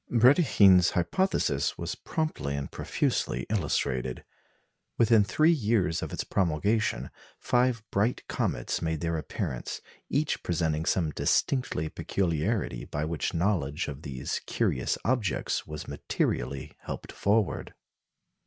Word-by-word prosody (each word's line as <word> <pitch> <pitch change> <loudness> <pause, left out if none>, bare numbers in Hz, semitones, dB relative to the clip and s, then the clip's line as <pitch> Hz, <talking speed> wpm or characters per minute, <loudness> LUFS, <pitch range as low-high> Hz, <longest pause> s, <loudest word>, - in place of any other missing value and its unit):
Brédikhine's 115 - +6
hypothesis 85 - +1
was - - -3
promptly 155 - -3
and 70 0 -4
profusely - - -1
illustrated. 65 - -1 0.7
Within 115 -2 +5
three 155 +10 +3
years 105 - +1
of - - -4
its - - -2
promulgation, 100 +5 0 0.3
five 125 -2 +1
bright 110 +5 +1
comets - - -1
made 80 -1 -1
their 85 -1 0
appearance, 65 -5 -4 0.3
each 145 +1 0
presenting 80 -2 0
some 80 -5 +1
distinctive 80 - 0
peculiarity 85 - -1
by 75 +1 -3
which 80 -1 -2
knowledge 85 -4 0
of 70 -1 -6
these 65 -5 -4
curious - - 0
objects 120 -7 0
was 75 -1 -7
materially 65 +2 -2
helped - - -7
forward. 105 0 0
90 Hz, 115 wpm, -28 LUFS, 75-115 Hz, 0.7 s, Brédikhine's